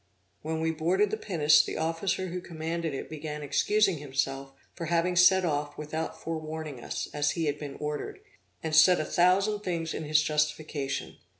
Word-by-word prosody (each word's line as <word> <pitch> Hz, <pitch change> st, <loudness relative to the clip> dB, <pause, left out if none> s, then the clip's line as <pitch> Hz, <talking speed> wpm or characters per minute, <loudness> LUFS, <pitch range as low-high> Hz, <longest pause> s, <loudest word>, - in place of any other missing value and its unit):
When 160 Hz, +1 st, -3 dB
we 160 Hz, 0 st, +1 dB
boarded 180 Hz, +6 st, +1 dB
the -, -, +1 dB
pinnace, 155 Hz, -8 st, +4 dB
the -, -, -5 dB
officer 165 Hz, +3 st, -1 dB
who 180 Hz, +1 st, -4 dB
commanded 165 Hz, -2 st, -4 dB
it -, -, -5 dB
began 150 Hz, -1 st, -6 dB
excusing 195 Hz, +4 st, +2 dB
himself 135 Hz, -1 st, -2 dB, 0.2 s
for 170 Hz, -2 st, -5 dB
having 170 Hz, +2 st, +1 dB
set 185 Hz, +1 st, +6 dB
off 145 Hz, -2 st, -2 dB
without 155 Hz, +2 st, -4 dB
forewarning 155 Hz, -4 st, -5 dB
us, -, -, -4 dB
as 145 Hz, 0 st, +1 dB
he 165 Hz, -, 0 dB
had 150 Hz, 0 st, -1 dB
been 145 Hz, -2 st, -6 dB
ordered, 150 Hz, -, -4 dB, 0.4 s
and 160 Hz, -1 st, -1 dB
said 175 Hz, +3 st, +7 dB
a 155 Hz, -, -1 dB
thousand 195 Hz, +6 st, +3 dB
things 170 Hz, -5 st, -3 dB
in -, -, -4 dB
his 150 Hz, 0 st, +3 dB
justification. 150 Hz, -2 st, -2 dB
160 Hz, 175 wpm, -28 LUFS, 150-175 Hz, 0.4 s, said